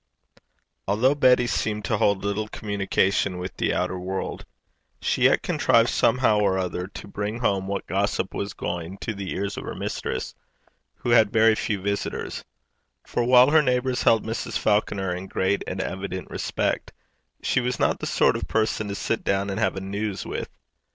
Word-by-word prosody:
Although 110 Hz, +8 st, +3 dB
Betty 125 Hz, -4 st, +4 dB
seemed 105 Hz, -3 st, -1 dB
to 110 Hz, -, 0 dB
hold 100 Hz, -1 st, +2 dB
little 105 Hz, +1 st, -1 dB
communication 100 Hz, -2 st, 0 dB
with 90 Hz, 0 st, -6 dB
the -, -, +1 dB
outer 90 Hz, -, -1 dB
world, 95 Hz, +1 st, -4 dB, 0.5 s
she -, -, +1 dB
yet -, -, +4 dB
contrived -, -, +3 dB
somehow 125 Hz, -5 st, +3 dB
or 100 Hz, -2 st, +2 dB
other 90 Hz, -1 st, -2 dB
to 100 Hz, -, -10 dB
bring 105 Hz, +2 st, -3 dB
home 100 Hz, -5 st, 0 dB
what 100 Hz, 0 st, -3 dB
gossip -, -, -1 dB
was 100 Hz, -, -3 dB
going 85 Hz, +2 st, -4 dB
to 110 Hz, -, -3 dB
the 100 Hz, -2 st, -5 dB
ears 100 Hz, +1 st, -3 dB
of -, -, -5 dB
her -, -, -6 dB
mistress, -, -, -4 dB, 0.6 s
who 120 Hz, -, -3 dB
had 110 Hz, -3 st, +5 dB
very 110 Hz, 0 st, +5 dB
few 105 Hz, -2 st, -1 dB
visitors; 100 Hz, +2 st, -3 dB, 0.6 s
for, 120 Hz, -, -1 dB
while 125 Hz, +3 st, +6 dB
her 160 Hz, 0 st, +6 dB
neighbours 125 Hz, -2 st, 0 dB
held 115 Hz, -1 st, +3 dB
Mrs. 115 Hz, +1 st, -3 dB
Falconer 100 Hz, -3 st, +1 dB
in 90 Hz, +2 st, -6 dB
great 95 Hz, +1 st, 0 dB
and 95 Hz, -, -4 dB
evident 95 Hz, -1 st, -4 dB
respect, -, -, -2 dB, 0.5 s
she -, -, +2 dB
was 125 Hz, 0 st, -1 dB
not -, -, +2 dB
the -, -, -3 dB
sort -, -, +3 dB
of -, -, -4 dB
person 110 Hz, -1 st, 0 dB
to 100 Hz, -, -4 dB
sit 115 Hz, -, -2 dB
down 100 Hz, 0 st, 0 dB
and 95 Hz, -, -3 dB
have 110 Hz, -, +1 dB
a 95 Hz, -, -4 dB
news 100 Hz, +1 st, -3 dB
with. -, -, -4 dB
100 Hz, 180 wpm, -25 LUFS, 95-115 Hz, 0.6 s, while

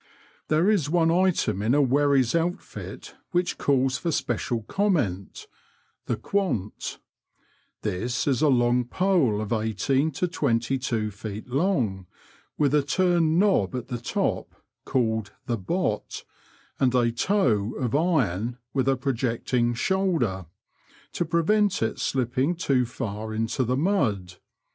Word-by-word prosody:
There 155 Hz, +4 st, +2 dB
is 195 Hz, -9 st, +2 dB
one 165 Hz, 0 st, +3 dB
item 180 Hz, -, +1 dB
in 115 Hz, +6 st, +2 dB
a 145 Hz, -, +4 dB
wherry's 135 Hz, -2 st, +3 dB
outfit 170 Hz, +2 st, -4 dB, 0.2 s
which 175 Hz, 0 st, 0 dB
calls 135 Hz, -1 st, +1 dB
for 170 Hz, -, -1 dB
special 120 Hz, -4 st, -1 dB
comment 120 Hz, -, -1 dB, 0.3 s
— -, -, -41 dB
the -, -, 0 dB
quant: 180 Hz, -, -2 dB, 0.9 s
this 120 Hz, +7 st, -2 dB
is 135 Hz, -1 st, +1 dB
a 155 Hz, -, +4 dB
long 125 Hz, -2 st, +3 dB
pole 165 Hz, -, +1 dB
of 110 Hz, +1 st, -2 dB
eighteen 115 Hz, +7 st, +1 dB
to 180 Hz, -, -1 dB
twenty 130 Hz, -5 st, 0 dB
two 110 Hz, -4 st, -2 dB
feet 105 Hz, +3 st, -7 dB
long, 125 Hz, -, 0 dB, 0.5 s
with 145 Hz, -1 st, +2 dB
a 150 Hz, -, +5 dB
turned 170 Hz, +1 st, +2 dB
knob 185 Hz, -, +2 dB
at 125 Hz, -, -5 dB
the 120 Hz, -, -3 dB
top, 120 Hz, -, -2 dB, 0.3 s
called 110 Hz, -5 st, 0 dB
the 115 Hz, -2 st, -2 dB
hot," 170 Hz, -, -1 dB, 0.6 s
and 130 Hz, -1 st, +2 dB
a 120 Hz, -2 st, +3 dB
toe 120 Hz, -, +1 dB
" -, -, -11 dB
of 125 Hz, -5 st, -2 dB
iron, 125 Hz, -, +1 dB, 0.2 s
with 130 Hz, -2 st, 0 dB
a 135 Hz, -, +2 dB
projecting 120 Hz, -1 st, 0 dB
shoulder 130 Hz, -, 0 dB, 0.3 s
'* -, -, -29 dB
to 175 Hz, -, -1 dB
prevent 190 Hz, -, +2 dB
it 110 Hz, -, -2 dB
slipping 130 Hz, +5 st, 0 dB
too 135 Hz, -8 st, +1 dB
far 110 Hz, -2 st, -5 dB
into 115 Hz, +3 st, 0 dB
the 125 Hz, +2 st, 0 dB
mud. 110 Hz, -, 0 dB
130 Hz, 140 wpm, -25 LUFS, 115-165 Hz, 0.9 s, a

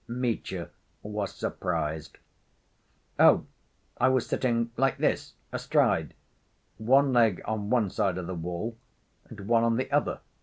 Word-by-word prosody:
Mitya 115 Hz, -7 st, -3 dB, 0.3 s
was 105 Hz, -1 st, -3 dB
surprised. 75 Hz, 0 st, -3 dB, 1.0 s
"Oh, -, -, +6 dB, 0.5 s
I 130 Hz, -, +4 dB
was 130 Hz, -2 st, +2 dB
sitting 115 Hz, -2 st, 0 dB
like 135 Hz, 0 st, +1 dB
this, -, -, -1 dB, 0.2 s
astride, -, -, +1 dB, 0.6 s
one 135 Hz, +4 st, +4 dB
leg 115 Hz, -6 st, +4 dB
on 105 Hz, -2 st, -3 dB
one 110 Hz, -6 st, +2 dB
side 95 Hz, -2 st, 0 dB
of 90 Hz, -, -4 dB
the 95 Hz, -, -4 dB
wall 90 Hz, +7 st, -4 dB, 0.5 s
and 105 Hz, -, -11 dB
one 115 Hz, +3 st, +2 dB
on 115 Hz, 0 st, +2 dB
the 130 Hz, +2 st, -2 dB
other." 145 Hz, +1 st, 0 dB
115 Hz, 130 wpm, -28 LUFS, 95-125 Hz, 1.0 s, Oh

